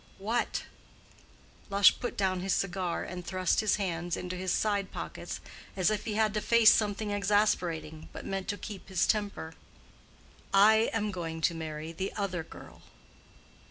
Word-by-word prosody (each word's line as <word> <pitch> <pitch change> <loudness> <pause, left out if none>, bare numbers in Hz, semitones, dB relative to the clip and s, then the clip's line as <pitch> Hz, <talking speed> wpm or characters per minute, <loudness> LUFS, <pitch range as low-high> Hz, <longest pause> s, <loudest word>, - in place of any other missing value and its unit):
"What?" 225 +5 -1 1.1
Lush 200 -1 +5
put 245 - -4
down 190 -2 +1
his 190 0 0
cigar 185 -2 -1
and 180 -1 -6
thrust 185 0 0
his 215 -2 +3
hands 175 -4 -2
into 180 0 -4
his 185 0 -2
side 205 -3 0
pockets, - - -6 0.4
as 185 +2 +3
if 210 -1 -2
he 215 -2 -2
had 215 -1 +2
to 210 - -1
face 230 -1 +6
something 210 0 0
exasperating, 185 -7 0
but - - -8
meant 195 -1 -3
to 205 -2 -2
keep 205 -2 -8
his 185 -2 +2
temper. 205 -6 -1 1.0
"I 220 +3 +6
am 210 -2 -1
going 165 -3 -4
to 170 - +2
marry 160 -1 -5
the 190 +4 -3
other 195 -4 -2
girl." - - -13
195 Hz, 160 wpm, -30 LUFS, 175-210 Hz, 1.1 s, face